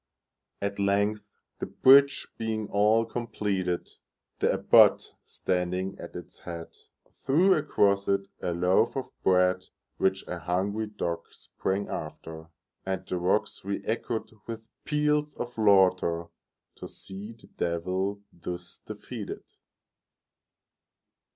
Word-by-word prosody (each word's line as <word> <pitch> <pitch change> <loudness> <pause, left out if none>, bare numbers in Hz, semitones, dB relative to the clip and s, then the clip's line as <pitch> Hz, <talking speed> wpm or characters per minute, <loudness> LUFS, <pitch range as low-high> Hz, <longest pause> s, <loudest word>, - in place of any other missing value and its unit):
At 100 0 -2
length, 100 +2 +2 0.4
the - - -3
bridge 140 +1 +6
being 110 -2 -2
all 105 +3 +3
completed, 100 -6 -2 0.5
The - - +3
Abbot, - - +5
standing 90 +1 -1
at - - -9
its - - -9
head, 85 -1 -8 0.5
Threw 170 +8 +5
across 100 - +2
it 100 0 +1
a - - -1
loaf 90 +6 +2
of 135 - -4
bread, 90 0 +3 0.3
Which 95 0 0
a 90 - -4
hungry 100 +5 -1
dog 85 -5 -3
sprang 95 +2 -3
after, 80 +1 -7 0.4
And 95 -1 -3
the 90 - -2
rocks 90 +2 0
reëchoed 110 +3 -3 0.2
with 115 -1 -6 0.2
peals 150 0 +1
of 120 0 -5
laughterTo 95 -6 +3 0.6
see 100 +4 -9
the 115 - -19
Devil 95 +4 -1
thus 90 +1 -7
defeated! - - -7
100 Hz, 110 wpm, -28 LUFS, 90-110 Hz, 0.6 s, bridge